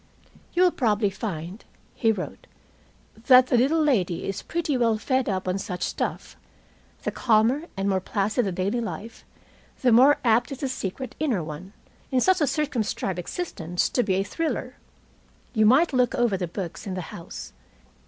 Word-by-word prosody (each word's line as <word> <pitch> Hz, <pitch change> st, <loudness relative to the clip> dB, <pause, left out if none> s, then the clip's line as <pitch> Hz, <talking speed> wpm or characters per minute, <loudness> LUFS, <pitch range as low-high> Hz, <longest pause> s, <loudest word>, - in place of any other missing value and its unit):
"You 355 Hz, -, +4 dB
will 360 Hz, -, +5 dB
probably 210 Hz, -6 st, +1 dB
find," 190 Hz, -1 st, -6 dB, 0.3 s
he 225 Hz, -, +2 dB
wrote, 200 Hz, -4 st, -6 dB, 0.8 s
"that 255 Hz, -1 st, +8 dB
the 255 Hz, -, +1 dB
little 275 Hz, +7 st, +3 dB
lady 195 Hz, -, +1 dB
is 195 Hz, 0 st, -3 dB
pretty 325 Hz, -4 st, -2 dB
well 230 Hz, -3 st, +2 dB
fed 260 Hz, +3 st, 0 dB
up 190 Hz, -1 st, -2 dB
on 185 Hz, +1 st, 0 dB
such 185 Hz, -3 st, -4 dB
stuff. -, -, -3 dB, 0.7 s
The -, -, -1 dB
calmer 235 Hz, +6 st, +2 dB
and 195 Hz, +1 st, -1 dB
more 190 Hz, -1 st, +2 dB
placid 210 Hz, +5 st, 0 dB
the -, -, -1 dB
daily 190 Hz, +6 st, -1 dB
life, 225 Hz, 0 st, -7 dB, 0.6 s
the 250 Hz, -, +5 dB
more 260 Hz, +6 st, +6 dB
apt 240 Hz, +3 st, +3 dB
is 275 Hz, -, -4 dB
the 270 Hz, -, -1 dB
secret 255 Hz, +2 st, -4 dB
inner 255 Hz, -, 0 dB
one, 160 Hz, +6 st, -8 dB, 0.4 s
in 260 Hz, -, +2 dB
such 370 Hz, +5 st, +3 dB
a 295 Hz, -, +3 dB
circumscribed 235 Hz, -, -1 dB
existence, 175 Hz, -, -2 dB
to 245 Hz, -, +1 dB
be 195 Hz, -5 st, 0 dB
a 195 Hz, -, +1 dB
thriller! 325 Hz, +10 st, -3 dB, 0.8 s
You 215 Hz, -3 st, +4 dB
might 285 Hz, +7 st, +4 dB
look 250 Hz, 0 st, +2 dB
over 240 Hz, -5 st, +2 dB
the 180 Hz, -2 st, -2 dB
books 175 Hz, +2 st, -6 dB
in 190 Hz, -, -3 dB
the 185 Hz, -, -3 dB
house. 170 Hz, -, -9 dB
225 Hz, 175 wpm, -25 LUFS, 190-260 Hz, 0.8 s, that